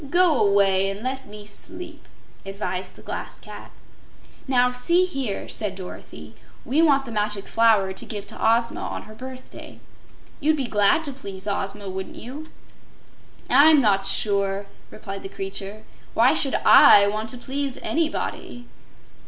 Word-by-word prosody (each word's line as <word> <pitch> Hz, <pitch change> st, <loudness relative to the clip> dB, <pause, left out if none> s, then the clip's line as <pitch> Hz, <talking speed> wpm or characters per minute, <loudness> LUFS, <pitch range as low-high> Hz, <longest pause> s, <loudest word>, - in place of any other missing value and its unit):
Go 350 Hz, -3 st, +3 dB
away 195 Hz, -1 st, +3 dB
and 200 Hz, +2 st, -6 dB
let 265 Hz, +1 st, -4 dB
me 210 Hz, 0 st, -11 dB
sleep," 280 Hz, +11 st, -10 dB, 0.4 s
advised 195 Hz, -1 st, -5 dB
the -, -, -16 dB
Glass -, -, -6 dB
Cat. -, -, -11 dB, 0.8 s
"Now, 250 Hz, -1 st, +3 dB
see 340 Hz, +9 st, +2 dB
here," 270 Hz, -, -4 dB
said 205 Hz, -3 st, -3 dB
Dorothy; 185 Hz, -1 st, -10 dB, 0.3 s
"we 290 Hz, +5 st, +2 dB
want 280 Hz, -4 st, +3 dB
the 235 Hz, -, -8 dB
Magic 210 Hz, -2 st, -1 dB
Flower 220 Hz, -4 st, +3 dB
to -, -, -5 dB
give 205 Hz, -2 st, -4 dB
to -, -, -10 dB
Ozma 230 Hz, +1 st, +2 dB
on -, -, -5 dB
her 215 Hz, -, -13 dB
birthday. 255 Hz, +3 st, -11 dB, 0.6 s
You'd 310 Hz, +1 st, +2 dB
be 275 Hz, -, -1 dB
glad 210 Hz, +7 st, +2 dB
to 285 Hz, -3 st, -4 dB
please 200 Hz, -7 st, -6 dB
Ozma, 200 Hz, 0 st, -2 dB
wouldn't 190 Hz, 0 st, -6 dB
you?" 290 Hz, +7 st, -9 dB, 1.0 s
"I'm 310 Hz, +1 st, +6 dB
not 195 Hz, -5 st, +2 dB
sure," 200 Hz, -1 st, 0 dB, 0.2 s
replied 195 Hz, 0 st, -8 dB
the 195 Hz, -, -7 dB
creature. 195 Hz, +2 st, -6 dB, 0.3 s
"Why -, -, +5 dB
should -, -, +1 dB
I 200 Hz, -, +8 dB
want 215 Hz, +2 st, -2 dB
to 250 Hz, -, -4 dB
please 270 Hz, +2 st, -3 dB
anybody?" 310 Hz, -6 st, -3 dB
215 Hz, 150 wpm, -23 LUFS, 200-270 Hz, 1.0 s, I